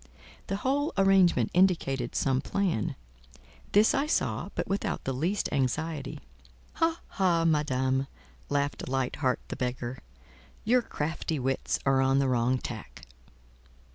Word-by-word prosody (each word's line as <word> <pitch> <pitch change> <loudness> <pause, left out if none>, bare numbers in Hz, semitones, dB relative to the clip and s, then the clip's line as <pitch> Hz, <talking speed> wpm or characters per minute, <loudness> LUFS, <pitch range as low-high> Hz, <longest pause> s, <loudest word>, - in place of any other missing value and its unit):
The 195 - -1
whole 275 +8 0
arrangement 190 - +4
indicated 165 -9 +2
some 135 -1 +1
plan; 185 - -1 0.8
this 210 +2 +5
I 285 0 +1
saw, - - 0
but - - -2
without 195 +1 -2
the 135 - -2
least 170 +10 0
anxiety. 145 +2 -1 0.6
"Ha! 330 +1 +2
ha! 175 -4 +1
Madame," 135 -4 +1 0.4
laughed 140 -2 -1
Light 130 -1 -1
heart 130 -3 0
the - - -4
Beggar, 125 0 -3 0.7
"your 245 +3 +4
crafty 160 -5 -3
wits 135 0 -1
are 135 -1 +4
on 135 0 +3
the 140 -1 +2
wrong 125 0 +2
tack." 110 - -8
145 Hz, 130 wpm, -28 LUFS, 130-190 Hz, 0.8 s, this